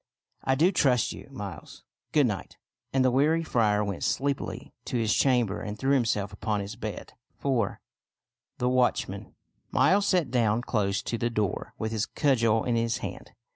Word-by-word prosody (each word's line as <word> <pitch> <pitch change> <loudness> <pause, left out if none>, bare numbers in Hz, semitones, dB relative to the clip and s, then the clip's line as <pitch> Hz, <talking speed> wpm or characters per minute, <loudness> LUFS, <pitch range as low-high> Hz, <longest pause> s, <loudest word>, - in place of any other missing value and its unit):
" - - -41
I - - +4
do 165 +7 +4
trust 130 - +2
you, - - -10
Miles. 100 - -8 0.3
Good 150 -2 +4
night! 105 -6 -4 0.2
" - - -58
And 130 -1 +2
the 130 - +4
weary 155 +6 +3
friar 105 -8 +2
went 100 -3 -4
sleepily 140 0 -2
to - - -2
his 110 -2 +2
chamber 120 -7 +2
artd 105 0 -5
threw 135 +3 +1
himself 105 -6 +1
upon 105 0 -1
his 100 +2 -5
bed. 110 -5 -6 0.2
IV. 125 -8 0 0.8
THE 125 - 0
WATCHMAN 125 -1 0 0.3
Miles 200 +1 +3
sat 175 -9 +2
down 120 -2 +2
close 100 -5 0
to 115 - -3
the 120 - +1
door 105 -5 -2
with 110 0 -3
his 110 -1 -1
cudgel 115 -6 +2
in 120 - 0
his 115 0 +1
hand. - - -8
115 Hz, 175 wpm, -27 LUFS, 105-135 Hz, 0.8 s, I